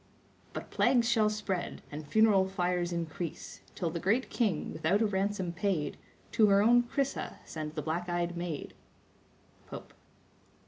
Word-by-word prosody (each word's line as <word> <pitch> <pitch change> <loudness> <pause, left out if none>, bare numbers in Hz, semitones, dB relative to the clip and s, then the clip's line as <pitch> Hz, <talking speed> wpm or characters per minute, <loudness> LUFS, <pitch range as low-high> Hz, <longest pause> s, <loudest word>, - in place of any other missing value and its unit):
"But - - -6
plagues 240 -3 +3
shall 220 -3 +4
spread, 205 -4 -3
and 150 0 -7
funeral 200 +2 +4
fires 180 -2 0
increase, 170 -1 -5
Till 170 -3 -1
the 170 - -3
great 225 +9 +1
king, 205 -10 0
without 175 +7 +2
a - - +3
ransom 195 -3 -1
paid, 175 -5 -1 0.4
To 215 - +5
her 200 0 +5
own 240 +2 +6
Chrysa 275 +3 -2
send 155 -1 -6
the 150 - -3
black 170 +3 -2
eyed 175 0 -1
maid." 170 -3 -4 0.9
—Pope. - - -9
180 Hz, 145 wpm, -31 LUFS, 170-210 Hz, 0.9 s, own